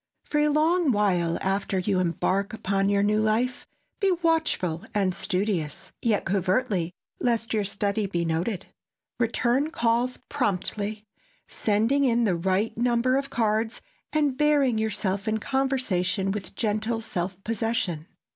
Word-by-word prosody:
For 295 - -1
a 300 - +4
long 315 +1 +3
while 180 -6 +1
after 195 0 0
you 185 +1 +1
embark 185 +3 0
upon 195 -2 0
your 200 0 +3
new 210 +1 +2
life, 230 +4 0 0.3
be 395 -4 +3
watchful 315 - +1
and 195 -3 +2
studious—yet 190 +2 -2
covertly, 190 -1 0 0.3
lest 230 -2 0
your 215 -2 +1
study 200 +1 -1
be 170 -3 -1
noted. 170 +5 -1 0.5
Return 240 +5 +1
calls 240 -2 +1
promptly, 210 -3 -1 0.4
sending 225 +7 +1
in 240 -2 +3
the 195 -6 +2
right 190 +5 0
number 240 +1 +2
of 275 0 -1
cards, 220 -1 0 0.3
and 295 -4 +1
bearing 285 -6 +3
yourself 205 -1 -1
in 220 0 +1
conversation 220 -8 0
with 195 -1 -5
gentle 220 +1 -1
self 185 -4 -3
possession. 220 -8 -1
215 Hz, 130 wpm, -26 LUFS, 190-245 Hz, 0.5 s, a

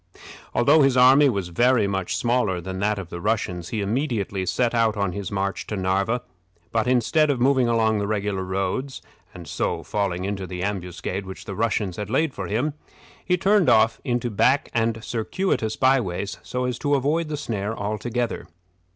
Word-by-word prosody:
Although 145 +6 +5
his 135 -2 +3
army 135 +3 +7
was 100 -7 -2
very 120 +5 +3
much 95 -2 -2
smaller 120 -7 +1
than 95 +2 -6
that 105 +1 +1
of 95 -4 -6
the 85 - -6
Russians, 90 -5 -1
he 110 - -2
immediately 100 -4 -1
set 115 +7 +1
out 115 -2 +2
on 100 -2 0
his 100 +1 -5
march 100 0 -2
to 105 - -3
Narva; 95 +6 0 0.5
but, 115 +1 0
instead 135 +5 +3
of 135 -3 +1
moving 130 0 +3
along 110 -2 +2
the 100 - -2
regular 100 -2 -1
roads, 95 +9 -3 0.3
and 85 -3 -11
so - - -2
falling 95 -3 -2
into 100 -1 -3
the 90 0 -5
ambuscade 95 0 -4
which 95 - -9
the 100 - -5
Russians 105 -3 -1
had 105 -1 -4
laid 140 +4 +1
for 95 - -5
him, 120 - -1 0.5
he 180 -1 +1
turned 200 0 +3
off 110 0 +4
into 120 -2 -1
back 135 +7 +2
and 115 -1 0
circuitous 115 - -1
by 135 +1 +4
ways, 95 0 -4
so 125 0 -3
as 125 -2 -3
to 145 -1 +1
avoid 150 +5 0
the 150 -1 -3
snare 110 -6 -3
altogether. 115 +3 -3
110 Hz, 185 wpm, -24 LUFS, 95-125 Hz, 0.5 s, army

